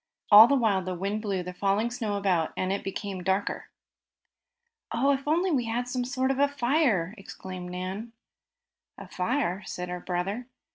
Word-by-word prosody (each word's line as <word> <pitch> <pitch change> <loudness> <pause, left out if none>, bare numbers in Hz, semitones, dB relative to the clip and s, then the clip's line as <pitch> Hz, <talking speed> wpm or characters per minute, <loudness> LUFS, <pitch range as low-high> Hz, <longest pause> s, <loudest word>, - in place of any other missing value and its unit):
All 215 +2 +11
the 280 - +3
while 220 -7 +2
the 185 0 -4
wind 200 +4 -2
blew 195 -4 -2
the 180 +1 -7
falling 200 +5 0
snow 220 -4 -2
about, 180 -5 +1
and 185 +1 0
it 200 - -3
became 195 -1 -4
darker. 190 +2 -1 1.2
"Oh, 265 +5 +2
if 275 +1 -4
we - - +2
only 325 -7 +2
had 240 +2 -2
some 250 0 -2
sort 260 +1 0
of 270 - -2
a 285 - +5
fire!" 250 - +1
exclaimed 185 -2 -8
Nan. 185 +5 -5 0.9
"A - - -10
fire?" 195 -1 -1
said 180 0 -5
her 180 0 -4
brother. 190 +7 -3
205 Hz, 175 wpm, -27 LUFS, 185-250 Hz, 1.2 s, All